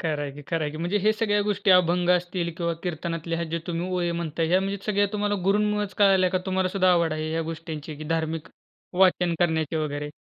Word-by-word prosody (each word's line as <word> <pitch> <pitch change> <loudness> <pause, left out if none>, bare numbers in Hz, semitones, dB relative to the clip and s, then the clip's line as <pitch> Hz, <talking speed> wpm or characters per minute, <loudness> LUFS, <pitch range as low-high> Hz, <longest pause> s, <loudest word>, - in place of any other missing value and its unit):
खरं 155 -3 -1
आहे 145 - -4
की 145 +1 -11
खरं 165 -2 -1
आहे 150 - -1
की 155 - -8
म्हणजे 175 +6 0
हे 215 +2 +3
सगळ्या 205 -1 +1
गोष्टी 205 -1 +1
अभंग 180 -1 +4
असतील 175 -1 0
किंवा 170 -1 -1
कीर्तनातल्या 165 -1 -3
ह्या 170 - -2
जे 165 - -1
तुम्ही 175 0 -2
ओळी 175 -1 0
म्हणताय, 165 0 -2
ह्या 185 +2 +4
म्हणजे 195 +1 -2
सगळ्या 205 -1 +2
तुम्हाला 205 0 0
गुरूंमुळेच 210 0 +1
कळल्या 190 -2 +5
का? 185 - +1
तुम्हाला 190 0 +1
सुद्धा 185 -1 +2
आवड 170 -2 +2
आहे 155 0 -3
ह्या 165 0 -1
गोष्टींची 155 -2 -7
की 155 - -8
धार्मिक 160 0 -3 0.5
वाचन 180 -2 +3
करण्याचे 160 -2 +1
वगैरे? 150 -1 -3
175 Hz, 215 wpm, -25 LUFS, 160-190 Hz, 0.5 s, कळल्या